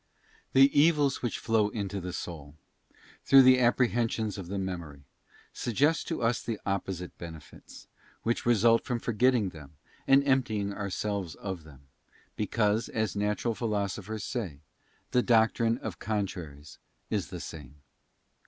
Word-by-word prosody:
Tue 135 +1 +8
evils 145 -2 +3
which 120 - -2
flow 110 -3 +1
into 100 -3 -4
the 90 +1 -5
soul, 75 -5 -7 0.7
through 135 -1 +8
the 130 0 +6
Apprehensions 120 -3 +1
Hap. - - -7
of - - -12
the 100 - -3
Memory, 85 -7 -5 0.5
suggest 145 +7 +1
to 165 - -3
us 115 +1 +1
the 115 -3 -4
opposite 95 -2 -3
benefits, 80 -4 -11 0.4
which 115 +1 0
result 115 0 +4
from 125 - -2
forgetting 120 -2 +2
them 75 -3 -13 0.3
and 135 +1 +5
emptying 110 -7 +1
ourselves 100 -2 -3
of 95 -5 -6
them; 70 -3 -15
Three - - -26
hene 70 -1 -34
because, 105 +1 0
as 110 -4 -2
natural 105 +3 0
Philosophers 105 -1 -3
say, 95 - -4 0.5
the 125 - +4
doctrine 115 -1 +3
of 110 -7 -7
con 105 -1 -1
siren 80 -7 -8
traries 75 +1 -14 0.3
is - - -1
the - - -7
same. 75 -4 -9
105 Hz, 150 wpm, -29 LUFS, 90-120 Hz, 0.7 s, Tue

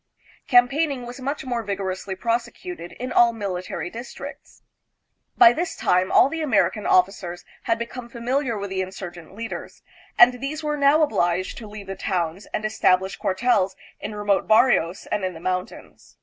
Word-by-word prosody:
Campaigning 260 +2 +3
was 245 +2 -8
much 275 +2 -4
more 240 -2 -1
vigorously 195 -2 -4
prosecuted 235 - -3
in 255 +1 -5
air 235 -1 +6
military 185 -5 -4
districts. 235 +3 -9 0.7
By 230 - +8
this 335 +4 -3
time 185 +1 +1
all - - +6
the 325 +3 -4
American 255 -7 +1
offi 185 +1 +5
cers 175 -2 -8 0.2
had 230 - +1
become 235 +1 -6
familiar 245 +1 -1
with 200 -1 -5
the 190 0 -1
insurgent 185 -2 -8
leaders, 225 +1 -7 0.3
and 250 0 +6
these 300 +3 -4
were 300 0 -1
now 290 +2 +4
obliged 180 - 0
to 220 - -9
leave 205 -1 -9
the 195 0 -6
towns 180 -1 -2
and 215 - -4
establish 190 -3 +2
cuartels 190 0 +1 0.2
in 210 +1 -6
remote 205 -1 +1
barrios 215 -6 +3
and 210 -2 0
in 185 -2 -2
the - - -9
mountains. 185 +4 -5
215 Hz, 165 wpm, -23 LUFS, 190-250 Hz, 0.7 s, By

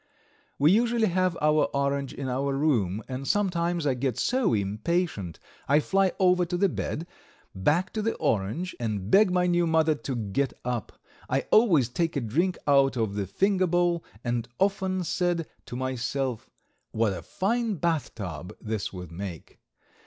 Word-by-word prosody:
We 150 +4 +5
usually 230 0 +3
have 185 -1 +1
our 150 0 +4
orange 140 -1 0
in 135 - -5
our 135 +2 -1
room, 110 - +1
and 135 +1 -5
sometimes 175 -5 0
I 140 - +3
get 125 -1 -2
so 250 - +1
impatient 105 - -1 0.3
I 145 +2 +5
fly 195 +4 +2
over 180 -1 +4
to 175 +1 -2
the 200 +2 +3
bed, 160 0 -3 0.5
back 150 - +1
to 215 - -1
the 225 +2 -1
orange, 110 - -1
and 105 -4 -3
beg 205 0 +6
my 180 0 +2
new 175 -1 +2
mother 160 -1 +3
to 140 -3 -5
get 115 +4 -1
up. 125 -3 -2 0.4
I - - +2
always 175 - +5
take 165 +7 -1
a - - +1
drink 160 - 0
out 140 -2 +4
of 110 -3 0
the 100 -1 -2
finger 190 - +2
bowl 175 -1 +1 0.2
and 120 -1 -1
often 190 -1 +1
said 175 -1 0 0.2
to - - -6
myself, 130 -1 -2 0.4
"What 110 -2 +1
a 90 - -6
fine 220 - -1
bathtub 105 - -3
this 110 -2 -3
would 90 -3 -8
make." 90 -1 -8
145 Hz, 160 wpm, -27 LUFS, 115-180 Hz, 0.5 s, beg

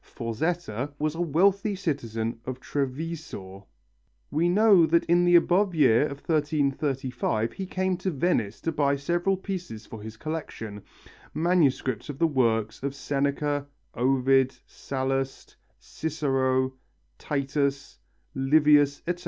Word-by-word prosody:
Forzetta 130 +1 -3
was 150 0 -1
a 165 - -4
wealthy 195 +6 +2
citizen 115 - -3
of 130 0 -5
Treviso. 135 - -5 0.6
We 170 +3 +2
know 195 -3 +5
that 170 +2 +3
in 175 +1 +3
the 175 0 +5
above 180 +2 +3
year 140 -2 +4
of 140 -1 -9
1335 140 -7 0
he 190 - -5
came 185 0 0
to 185 +1 -2
Venice 130 - 0
to 165 - -1
buy 140 -2 +1
several 175 +7 0
pieces 180 - -6
for 110 - -10
his 110 +1 -9
collection, 115 -9 -6 0.5
manuscripts 155 -7 +1
of 145 - -5
the 165 - +3
works 115 -7 +1
of 140 +1 -3
Seneca, 145 +1 -1 0.3
Ovid, 130 +1 +2
Sallust, 135 0 -3 0.2
Cicero, 135 -4 -1 0.5
Titus, 140 -1 -2 0.3
Livius, 145 +1 +4
etc. 175 0 -2
145 Hz, 120 wpm, -26 LUFS, 130-170 Hz, 0.6 s, know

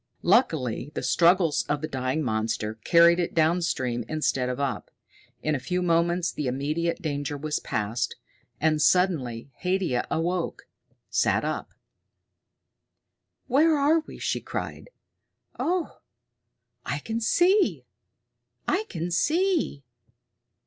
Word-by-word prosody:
Luckily 160 - +2
the - - -3
struggles 170 -2 +3
of 145 0 0
the 155 - -2
dying 130 +2 -2
monster 110 -2 -1
carried 170 +1 +6
it 175 - -2
downstream 155 -7 +1
instead 135 -5 0
of 125 +1 -3
up. 135 -6 -2 0.5
In 155 - +1
a 140 - 0
few 180 +8 -2
moments 170 +1 +1
the 150 - -3
immediate 150 +6 -1
danger 145 -2 -2
was 150 +1 -2
past. 110 +3 -2 0.4
And 155 -1 +2
suddenly 140 -10 +1
Haidia 180 -9 0
awoke, 175 +2 -2 0.5
sat - - +2
up. - - -4 1.7
"Where 300 +4 +4
are 295 +3 +4
we?" - - -10
she - - -2
cried. - - -6 0.7
"Oh, 360 0 -1 0.8
I - - -2
can 225 0 -3
see! 365 - +3 0.8
I 405 +4 +1
can 170 0 -4
see! 325 - +1
165 Hz, 115 wpm, -26 LUFS, 135-185 Hz, 1.7 s, carried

